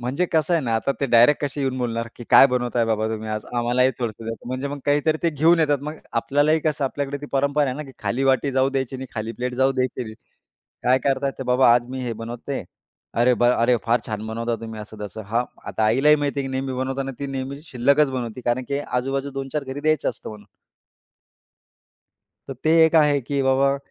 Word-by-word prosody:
म्हणजे 130 +8 -1
कसं 160 +2 +2
आहे 165 - +1
ना, 115 -3 -1
आता 125 +5 0
ते 140 - +1
डायरेक्ट 120 +5 +5
कशी 145 0 -4
येऊन 130 -1 -1
बोलणार, 115 -2 -2
की 120 - -9
"काय - - +9
बनवताय 125 -2 0
बाबा, 110 -1 0
तुम्ही 110 0 -4
आज 110 0 -3
आम्हालाही 125 +2 +2
थोडंसं 115 -2 -4
द्या." 115 0 -3
म्हणजे 130 +2 -3
मग 145 0 -5
काहीतरी 145 +2 +2
ते 170 - +2
घेऊन 160 +3 +4
येतात. 145 -2 +2
मग 150 +1 -5 0.3
आपल्यालाही 145 +6 +2
कसं 150 -2 -1
आपल्याकडे 140 +1 -3
ती 145 - -7
परंपरा 140 +2 +2
आहे 130 - -2
ना, 150 - -4
की 135 -3 -12
खाली 130 +3 -1
वाटी 135 +1 +2
जाऊ 130 +1 +3
द्यायची 135 -1 -2
नाही, 130 0 -7
खाली 110 0 -3
प्लेट 125 +1 -4
जाऊ 130 +2 +2
द्यायची 130 -1 -1
नाही. 110 -1 -9 0.7
काय 130 +1 +4
करतात, 135 0 +1
ते - - -3
बाबा 125 -1 +5
"आज 120 0 +1
मी 130 0 -4
हे 120 - -2
बनवते." 115 +2 -6 0.5
"अरे, 120 +2 +4
वा! 120 0 +5
अरे, 125 +1 +4
फार 115 +1 +3
छान 110 0 -4
बनवता 115 +1 -2
तुम्ही," 110 -1 -7
असं 105 0 -8
तसं. 105 +2 -7
हां, 115 +4 0 0.2
आता 110 - -1
आईलाही 135 +8 +5
माहिती 145 -1 -1
आहे, 135 - -3
की - - -6
नेहमी 130 0 -2
बनवताना 135 +1 -3
ती 140 - -4
नेहमी 135 +1 -5
शिल्लकच 140 0 +2
बनवते, 125 -2 -4
कारण 120 +1 0
की 140 - -1
आजूबाजू 135 +3 -2
2-4 135 +2 -4
घरी 135 +1 -6
द्यायचं 155 -1 +1
असतं - - -10
म्हणून. 105 -1 -11 2.0
तर 135 - -5
ते 155 - +3
एक 160 - +2
आहे, 150 -3 +4
की 140 +2 -2
बाबा. 135 +1 +3
130 Hz, 220 wpm, -23 LUFS, 120-140 Hz, 2.0 s, काय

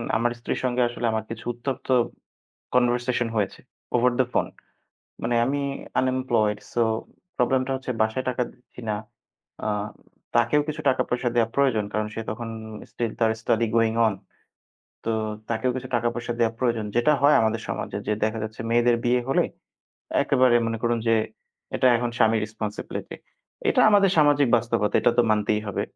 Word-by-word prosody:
আমার 120 +1 +2
স্ত্রীর 120 - -3
সঙ্গে 125 0 +1
আসলে 120 0 -4
আমার 110 -1 -1
কিছু 115 0 -7
উত্তপ্ত 125 +2 -5 0.9
কনভারসেশন 120 -1 +2
হয়েছে। 105 -3 -1 0.4
Over 125 +1 +3
the 130 - +3
phone. - - +2 0.8
মানে 120 +1 0
আমি 140 +3 0 0.4
আনএমপ্লয়েড 130 -5 +1 0.2
সো 120 - +1 0.6
প্রবলেম 130 +1 +2
টা - - -2
হচ্ছে 130 -1 -4
বাসায় 110 +4 0
টাকা 125 0 0
দিচ্ছি 125 0 -18
না। 105 - +1 0.7
আ - - 0 0.7
তাকেও 120 +5 +4
কিছু 155 0 -4
টাকা-পয়সা 125 -1 0
দেয়া 115 -2 +3
প্রয়োজন 130 -7 +2
কারণ, 110 0 0
সে 115 - -3
তখন 115 +1 -5 0.4
স্টিল 115 -2 -2
তার 115 -1 +3
study 115 +1 +1
going 115 -1 +2
on 110 - 0 0.9
তো, 115 - +1 0.4
তাকেও 115 +2 0
কিছু 130 0 -5
টাকা-পয়সা 120 0 -1
দেয়া 115 -1 +3
প্রয়োজন 115 -4 0
যেটা 120 +5 +4
হয় 145 +1 +6
আমাদের 110 -1 0
সমাজে। - - -3
যে 105 - +2
দেখা 110 +1 0
যাচ্ছে 110 +1 -6
মেয়েদের 120 0 +4
বিয়ে 125 +1 +3
হলে 135 - +3 0.8
একেবারে 130 -3 +4
মনে 115 0 -2
করুন 120 0 +1
যে, 115 - +5 0.6
এটা - - +2
এখন 120 0 -1
স্বামীর 110 0 +4
রেসপনসিবিলিটি। 105 0 -6 0.5
এটা - - +3
আমাদের 200 -2 +5
সামাজিক 145 -2 +5
বাস্তবতা, 115 -2 0
এটা - - +3
তো - - +7
মানতেই 105 0 +2
হবে। 100 - -1
120 Hz, 160 wpm, -25 LUFS, 110-130 Hz, 0.9 s, তো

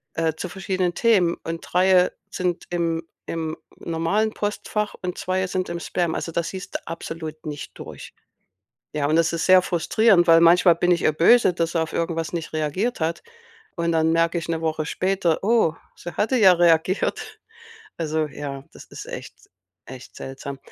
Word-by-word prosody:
äh, 165 -1 0
zu 165 +3 -6
verschiedenen 185 -2 -2
Themen 195 -8 +3
und 165 0 -4
3 185 0 +4 0.2
sind 180 -1 -2
im 165 -1 -1 0.2
im 160 -1 -3 0.2
normalen 170 +7 -1
Postfach 210 0 -3
und 180 -1 -4
2 185 0 -1
sind 185 -1 -2
im 170 0 -4
Spam. 170 -1 -1
Also, 165 - -4
da 170 - 0
siehst 185 +3 -7
du - - -5
absolut 160 -1 -7
nicht 150 -2 -6
durch. - - -10 0.8
Ja, 150 -1 -1
und 155 - +2
das 165 0 +3
ist 165 -1 -1
sehr 185 0 +7
frustrierend, 180 +1 +3
weil 165 0 +7
manchmal 170 +1 +6
bin 175 +2 +1
ich 170 - +2
ihr 155 - +3
böse, 180 +6 +5
dass 170 -1 -1
sie 170 - 0
auf 160 - -4
irgendwas 165 -1 -2
nicht 165 -2 -4
reagiert 160 +10 -1
hat. 160 +1 -2 0.5
Und 170 0 0
dann 160 0 +2
merke 165 +1 +2
ich 165 0 -5
'ne 165 - -1
Woche 155 -1 -1
später: 185 -1 0
„Oh, 220 -7 +3 0.2
sie 175 - -8
hatte 220 +5 +1
ja 195 -4 +7
reagiert.“ 175 +2 +1 0.6
Also, 155 -1 -1
ja, 140 -2 -7
das - - -12
ist - - -10
echt - - -8 0.5
echt 130 0 -11
seltsam. 135 +1 -7
170 Hz, 175 wpm, -23 LUFS, 160-185 Hz, 0.8 s, sehr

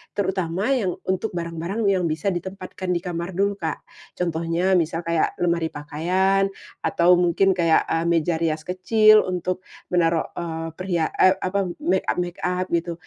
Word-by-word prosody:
Terutama 190 +3 -1
yang 210 -9 0
untuk 190 +3 -1
barang-barang 170 +5 -3
yang 185 -3 +1
bisa 160 +5 -1
ditempatkan 185 0 -4
di 170 - -1
kamar 175 0 -4
dulu, 200 +1 +1
Kak. 160 -3 -3 0.3
Contohnya, 170 +2 +1
misal 165 +1 -1
kayak 170 -1 0
lemari 170 -2 +1
pakaian, 185 +7 +1 0.4
atau 175 +1 +4
mungkin 180 +2 +3
kayak 165 -2 +4
eee, 165 +1 0
meja 165 -1 +1
rias 160 -2 0
kecil 215 +4 +4
untuk 185 0 -2 0.3
menaruh, 170 -2 +2
eee, 165 -1 -4
perhia 175 -3 -1
eee, 185 0 +6
apa, 195 0 -1
makeup-makeup 180 0 -1
gitu. 170 0 0
175 Hz, 140 wpm, -23 LUFS, 165-190 Hz, 0.4 s, eee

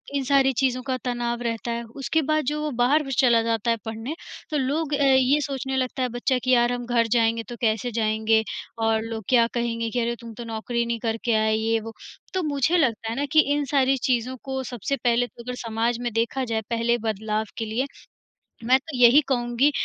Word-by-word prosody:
इन 275 - 0
सारी 270 0 +3
चीज़ों 255 -1 +1
का 260 0 -1
तनाव 240 -1 -2
रहता 230 0 -3
है। 235 0 -3 0.2
उसके 275 +5 +1
बाद 310 +1 +1
जो 300 +3 -1
वो 305 - -1
बाहर 285 +6 +4
भी 270 - -6
चला 235 -3 +5
जाता 230 0 0
है 230 - +1
पढ़ने, 225 +7 -5 0.3
तो 305 - -1
लोग 290 +3 -1
अ, 285 - +2
ये 265 +1 +4
सोचने 265 -1 -3
लगता 260 0 -2
है 250 - 0
बच्चा 245 +2 0
कि 255 - +1
यार 240 0 +4
हम 245 -1 -4
घर 235 -1 +2
जाएँगे 230 -1 +2
तो 240 - -6
कैसे 225 +1 0
जाएँगे 220 0 +2 0.4
और 225 0 +2
लोग 225 -1 -5
क्या 240 -2 +5
कहेंगे, 230 -1 -1
कि 245 +2 -2
अरे! 235 0 0
तुम 230 -1 -9
तो 240 +2 -8
नौकरी 235 +1 -2
नहीं 235 -1 -2
करके 230 +1 -1
आए 220 0 +2
ये 225 +1 +1
वो। 225 +1 -8 0.4
तो 370 -2 0
मुझे 295 +3 +1
लगता 230 -8 0
है 225 - -3
ना 280 +3 -1
कि 315 - +5
इन 290 0 0
सारी 270 -1 +2
चीज़ों 250 0 0
को 265 -1 -3
सबसे 245 +1 -3
पहले 240 0 +2
तो 235 - -13
अगर 250 0 -5
समाज 230 0 -1
में 240 -1 -2
देखा 230 +4 0
जाए 225 -2 -1
पहले 235 0 +1
बदलाव 220 -1 -2
के 225 - -2
लिए, 225 +5 -1 0.8
मैं 255 +3 +4
तो 290 -2 -8
यही 245 +4 +7
कहूँगी 240 +2 +2
240 Hz, 220 wpm, -24 LUFS, 230-265 Hz, 0.8 s, यही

